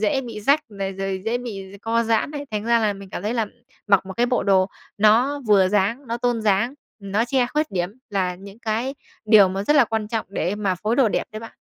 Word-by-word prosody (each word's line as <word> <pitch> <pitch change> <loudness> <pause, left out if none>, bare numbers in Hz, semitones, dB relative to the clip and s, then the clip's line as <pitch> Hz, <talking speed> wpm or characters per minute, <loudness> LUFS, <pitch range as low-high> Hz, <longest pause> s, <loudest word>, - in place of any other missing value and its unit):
dễ 220 +5 +1
bị 230 -4 -7
rách 280 +8 +3
này, 195 -2 -4
rồi 195 0 -3
dễ 230 +2 0
bị 200 -6 -7
d - - -10
co 230 +1 +1
giãn 225 +3 +1
này. 290 -1 -6
Thành 210 -1 -3
ra 235 0 +3
là 215 -2 +1
mình 195 -1 -11
cảm - - -5
thấy 220 +4 -1
là 225 -3 0 0.4
mặc 195 -2 +3
một 190 - -6
cái 240 - +2
bộ 245 - +1
đồ 190 -2 +3 0.3
nó 240 +7 +4
vừa 195 -3 +5
dáng, 210 +7 0
nó 230 - -2
tôn 240 -1 0
dáng, 215 +5 +2 0.2
nó 200 +3 -1
che 250 -1 +1
khuyết 305 +4 -1
điểm 175 -1 -1 0.2
là 185 -3 0
những 195 +3 -12
cái 235 +4 -2 0.3
điều 210 -3 +7
mà 195 +1 -3
rất 295 - +3
là 275 - +7
quan 220 -2 -3
trọng 225 -1 -2
để 185 -1 -2
mà 200 -3 0
phối 215 +6 -1
đồ 260 -5 +4
đẹp - - -1
đấy 215 - -6
bạn. 225 - -10
215 Hz, 250 wpm, -22 LUFS, 195-240 Hz, 0.4 s, điều